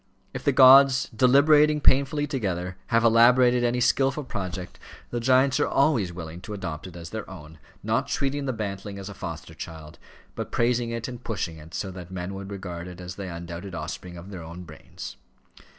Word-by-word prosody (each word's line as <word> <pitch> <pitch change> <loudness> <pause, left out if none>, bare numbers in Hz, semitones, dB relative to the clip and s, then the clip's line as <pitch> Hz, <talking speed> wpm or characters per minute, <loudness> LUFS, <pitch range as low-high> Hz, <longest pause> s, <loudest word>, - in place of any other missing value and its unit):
If - - -6
the 145 - +3
gods, 135 0 +7
deliberating 150 +5 +5
painfully 140 +1 +3
together, 95 - -3
have 115 -1 +2
elaborated 120 +2 +5
any 120 +1 +1
skilful 135 +3 +2
project, 95 -6 -6 0.3
the 120 - -1
giants 130 +2 +3
are - - +2
always 135 - +2
willing 85 0 -8
to 105 +2 -7
adopt 85 -4 -6
it 90 - -12
as 85 -1 -9
their 110 -1 -6
own, 80 -4 -11 0.2
not - - 0
treating 140 +1 -1
the 130 - 0
bantling 100 -3 -5
as 100 0 -7
a - - -7
foster 85 -3 -7
child, 80 -1 -9 0.3
but - - -6
praising 120 0 +1
it 115 0 -4
and 125 -1 -8
pushing 90 -7 -3
it 80 +1 -11
so 95 - -3
that 90 -2 -9
men 90 0 -5
should 95 0 -7
regard 90 -3 -6
it 90 0 -10
as 90 0 -7
the 95 -3 -6
undoubted 85 +2 -7
offspring 85 +2 -6
of 90 +4 -10
their 90 -3 -7
own 85 +2 -9
brains. 80 -5 -10
100 Hz, 190 wpm, -25 LUFS, 90-125 Hz, 0.3 s, gods